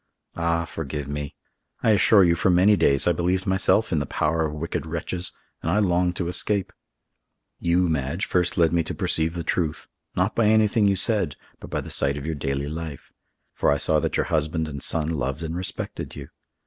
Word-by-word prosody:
Ah, 85 0 0
forgive 75 -3 -5
me! 70 0 -5 0.5
I 110 - +4
assure 100 0 +5
you, 85 -1 +4
for 85 +3 +1
many 95 +4 +5
days 70 -7 +3
I - - +4
believed 90 +3 0
myself 95 +3 +2
in 80 - +1
the 70 - -3
power 80 +1 0
of - - -6
wicked 80 -2 -3
wretches, 85 +2 -3 0.3
and - - -2
I 95 - +2
longed 90 -3 +1
to 90 - -2
escape. 100 +2 -1 0.9
You, 90 +1 +2
Madge, 80 +4 -1
first 90 -1 0
led 85 -2 +3
me 85 - +3
to - - -5
perceive 80 +1 0
the 85 - -3
truth, 80 -1 -2 0.3
not - - +1
by 115 -2 +3
anything 110 -1 +3
you 100 - +3
said, 95 - +2 0.2
but - - -10
by - - -2
the - - -8
sight 70 +1 +2
of 70 - -6
your 80 - -2
daily 70 -1 -3
life, 80 -2 -7 0.4
for - - +1
I 70 - +3
saw - - +4
that - - -1
your - - +1
husband 80 0 -1
and 70 -2 -7
son 80 -2 0
loved 75 -1 -2
and 80 +1 -4
respected 90 +1 -5
you! - - -9
85 Hz, 205 wpm, -24 LUFS, 75-90 Hz, 0.9 s, assure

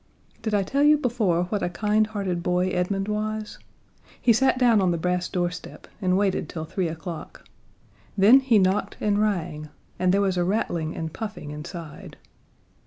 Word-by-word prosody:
Did 220 -2 -1
I 200 - +2
tell 275 +9 -1
you 300 +1 +6
before 225 - +1
what 205 -1 -1
a - - 0
kindhearted 210 -2 0
boy 180 +1 +1
Edmund 195 +2 -1
was? 215 0 -3 0.6
He 235 - +4
sat 260 +3 +3
down 235 -5 +4
on 185 - +2
the 170 - 0
brass 180 +2 -1
doorstep 175 0 -4 0.2
and 185 -1 +2
waited 195 -1 0
till 160 -2 -5
three 185 +2 -2
o'clock. 165 0 -7 0.7
Then 215 +7 +7
he 260 -4 +3
knocked 190 +1 +1
and 210 0 +1
rang, 160 -7 -2 0.3
and 185 0 +3
there 195 - +3
was 190 -2 +1
a 175 - +2
rattling 175 -4 -1
and 160 -1 -5
puffing 210 -9 -6
inside. 155 +1 -9
190 Hz, 170 wpm, -25 LUFS, 175-215 Hz, 0.7 s, Then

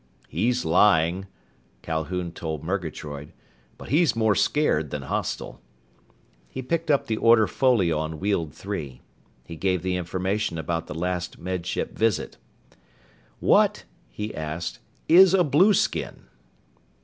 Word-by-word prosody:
"He's 120 - 0
lying," 90 +1 +3 0.6
Calhoun 85 +2 -3
told 80 -3 -5
Murgatroyd, 80 -5 -5 0.4
"but - - -11
he's 150 -5 +3
more 110 -2 +3
scared 90 - +1
than 70 0 -5
hostile." 65 - -4 0.9
He 130 - -6
picked 165 +5 -2
up 145 -2 +3
the 110 - -2
order 115 -1 +5
folio 100 - +2
on 80 0 -4
Weald 95 -6 -1
Three. 80 -7 -6 0.4
He 85 - -8
gave 90 +1 -1
the 95 -1 -1
information 95 +1 -2
about 80 +1 -3
the 75 - -7
last 90 +1 -3
Med 90 -1 -4
Ship - - -3
visit. 110 -2 0 1.0
"What?" - - +3 0.3
he 105 - -6
asked, 80 -4 -5 0.3
"is 185 +2 +7
a 180 - +4
blueskin?" 175 +7 +2
90 Hz, 125 wpm, -25 LUFS, 80-110 Hz, 1.0 s, is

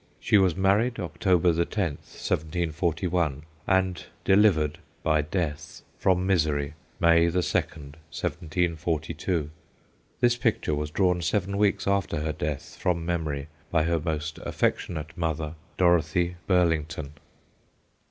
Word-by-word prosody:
She 105 - +4
was 95 -3 +3
marry'd 100 +6 +2
October 90 +1 +2
the 85 +1 +2
10th, 85 -6 -4
1741, 85 -1 -1 0.2
and 95 -2 +1 0.2
delivered 95 -7 +4 0.2
(by 80 -1 +3
death) 75 -1 -4 0.2
from 90 -1 +2
misery 75 -6 +1 0.3
May 85 -1 +5
the 90 +2 +1
2nd, 75 -3 -2
1742. 80 -1 -2 0.7
This 120 -1 +3
picture 90 -8 0
was 75 0 -2
drawn 90 +1 +1
seven 100 +4 0
weeks 100 0 +2
after 100 -5 0
her 80 0 -1
death 75 -2 -4
(from 85 -2 0
memory) 80 -5 -2 0.2
by 80 -2 +2
her 85 +1 +1
most 75 -1 -3
affectionate 75 -3 -2
mother, 80 -2 -2 0.2
Dorothy 85 0 +2
Burlington. 80 -5 +1
85 Hz, 115 wpm, -26 LUFS, 75-90 Hz, 0.7 s, May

